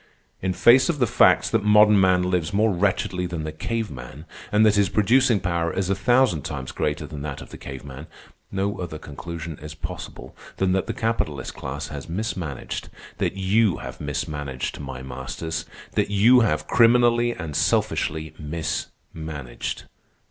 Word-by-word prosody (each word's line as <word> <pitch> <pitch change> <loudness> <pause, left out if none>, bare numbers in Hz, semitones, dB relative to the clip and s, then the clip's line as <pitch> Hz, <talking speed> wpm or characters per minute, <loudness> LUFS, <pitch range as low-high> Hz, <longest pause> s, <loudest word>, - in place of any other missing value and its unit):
In 95 - 0
face 120 - +6
of 165 - +1
the 130 - +3
facts 105 - +4
that - - +2
modern 105 -1 +6
man 90 -1 +4
lives 90 -1 0
more 110 0 +3
wretchedly 90 -1 0
than 85 -3 -4
the 80 - -4
cave 110 +8 -3
man, 65 +4 -9 0.3
and 105 +1 +5
that 105 - +5
his 100 -2 +3
producing 120 +2 +3
power 85 -2 -1
is 95 0 -1
a - - +2
thousand 120 - +3
times 65 -3 -5
greater 75 0 -2
than 75 -1 -8
that 70 -2 -5
of - - -11
the - - -8
cave 65 0 -8
man, 70 +3 -9 0.4
no 100 +1 -1
other 85 -4 -5
conclusion 80 +1 -7
is 75 +1 -8
possible - - -8 0.2
than 95 -1 +1
that 95 0 0
the - - -2
capitalist 110 - -2
class 70 +2 -5
has 70 +1 -7
mismanaged, 85 - -4 0.3
that - - 0
you 95 -1 +2
have - - -8
mismanaged, 75 -2 -4
my 65 -3 -7
masters, 65 +5 -5 0.3
that - - 0
you 110 +5 +6
have 75 -10 +1
criminally 120 +3 +4
and 80 -7 -6
selfishly 80 0 0
mismanaged. 80 -2 -5
85 Hz, 165 wpm, -24 LUFS, 75-105 Hz, 0.4 s, face